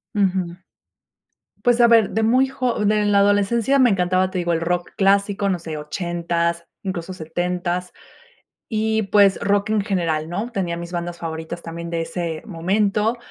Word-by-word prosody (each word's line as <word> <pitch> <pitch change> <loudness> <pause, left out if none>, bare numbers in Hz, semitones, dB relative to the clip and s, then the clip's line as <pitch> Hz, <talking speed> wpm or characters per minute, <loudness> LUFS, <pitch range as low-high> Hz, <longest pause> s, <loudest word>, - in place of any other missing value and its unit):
Ujú. 185 -3 0 1.1
Pues, 245 -1 +4
a 235 - +7
ver, 225 -3 +5
de 220 +2 0
muy 255 +4 +4
jo 250 -5 -1
de 210 0 +2
la 205 -1 +4
adolescencia 205 +6 +3
me 255 -2 +6
encantaba, 185 -1 +1
te 190 - -5
digo, 175 -1 0
el 165 - -1
rock 175 +1 -1
clásico, 200 0 +2
no 180 -2 0
sé, 160 -2 -6
ochentas, 170 +1 -2 0.2
incluso 185 -1 -4
setentas 175 +1 -3 0.7
y, 220 0 0
pues, 200 -1 +4
rock 200 +1 +1
en 215 -2 +2
general, 170 -6 -1
¿no? 205 +8 -3
Tenía 180 -5 -2
mis 170 0 -7
bandas 175 0 -4
favoritas, 160 +1 -5
también 170 0 -7
de 165 -1 -1
ese 165 -1 -4
momento 205 +5 0
185 Hz, 160 wpm, -21 LUFS, 170-210 Hz, 1.1 s, a